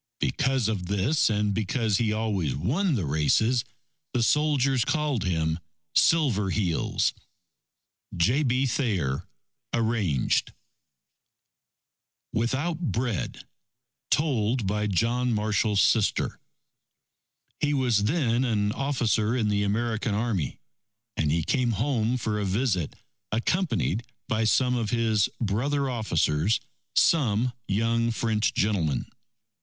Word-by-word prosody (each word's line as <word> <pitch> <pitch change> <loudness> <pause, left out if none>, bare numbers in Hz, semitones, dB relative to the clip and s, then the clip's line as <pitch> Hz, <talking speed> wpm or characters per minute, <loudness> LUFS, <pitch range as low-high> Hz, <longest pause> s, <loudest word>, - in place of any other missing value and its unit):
Because 135 -5 +1
of 100 -5 -2
this 100 - +2
and 105 -1 +1
because 110 0 0
he 115 -3 +1
always 105 - -1
won 150 - 0
the 100 -8 -1
races, 110 - +2 0.5
the 120 -2 +1
soldiers 140 -2 +2
called 145 -2 0
him: 80 -2 0 0.3
"Silver 125 -12 +3
Heels." 90 -5 0 1.0
J. 115 - +3
B. 130 -1 +1
Thayer 100 - -1 0.4
(Arranged) 110 - 0 1.8
WITHOUT 130 +9 -1
BREAD 120 -5 -3 0.6
Told 125 -6 +1
by 105 +2 0
John 120 +5 +1
Marshall's 105 -1 +1
Sister 110 -3 +1 1.2
He 145 0 +1
was 120 -6 +2
then 125 -2 +1
an 105 -4 +1
officer 120 -4 0
in 110 -4 +1
the 100 0 +1
American 110 +1 -1
Army, 105 - -1 0.6
and 75 -2 0
he 80 +1 +1
came 120 - +1
home 120 +1 0
for 110 -3 -2
a - - -1
visit, 95 - 0 0.4
accompanied 115 - 0 0.3
by 110 +1 0
some 125 +3 +3
of 115 -3 -1
his 110 -3 +2
brother 135 +7 0
officers, 90 -4 +1 0.4
some 125 -6 +3
young 115 +3 +1
French 110 -2 0
gentlemen. 85 - 0
110 Hz, 110 wpm, -26 LUFS, 100-125 Hz, 1.8 s, Silver